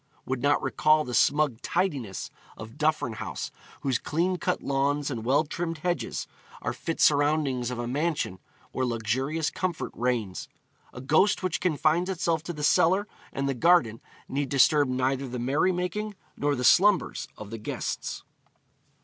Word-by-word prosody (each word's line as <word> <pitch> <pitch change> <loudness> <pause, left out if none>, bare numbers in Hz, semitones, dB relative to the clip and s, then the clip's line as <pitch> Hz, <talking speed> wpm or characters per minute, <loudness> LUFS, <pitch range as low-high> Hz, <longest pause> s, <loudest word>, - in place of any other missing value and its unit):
would 130 -1 -2
not 145 +1 +3
recall 155 0 +3
the 125 - -6
smug 140 0 +2
tidiness 145 - -2 0.3
of 110 +2 -9
Duffryn 150 -7 0
House, - - -5 0.3
whose 130 -4 0
clean 175 +4 0
cut - - -1
lawns 140 +1 0
and 115 -4 -4
well 135 +6 +3
trimmed 165 +2 -4
hedges 175 +2 -2 0.4
are - - -1
fit 165 - -4
surroundings 145 -4 +3
of 125 - -4
a 120 - -3
mansion 145 - -1 0.3
where 130 - -2
luxurious 130 +7 -1
comfort 180 -3 -3
reigns. 115 -6 -2 0.4
A 125 - -9
ghost 160 +10 +3
which 185 -3 0
confines 170 +1 +2
itself 170 -3 0
to 175 - -4
the 150 -2 -6
cellar 185 +7 +3 0.2
and 140 0 -2
the 135 - +1
garden 125 -5 +3 0.3
need 140 0 -2
disturb 145 +1 +4
neither 130 +1 0
the 125 0 -5
merrymaking 180 - 0 0.2
nor 145 0 0
the 125 - -3
slumbers 185 +2 +4
of 105 0 -9
the 115 - -5
guests. 105 - -4
145 Hz, 155 wpm, -27 LUFS, 125-165 Hz, 0.4 s, disturb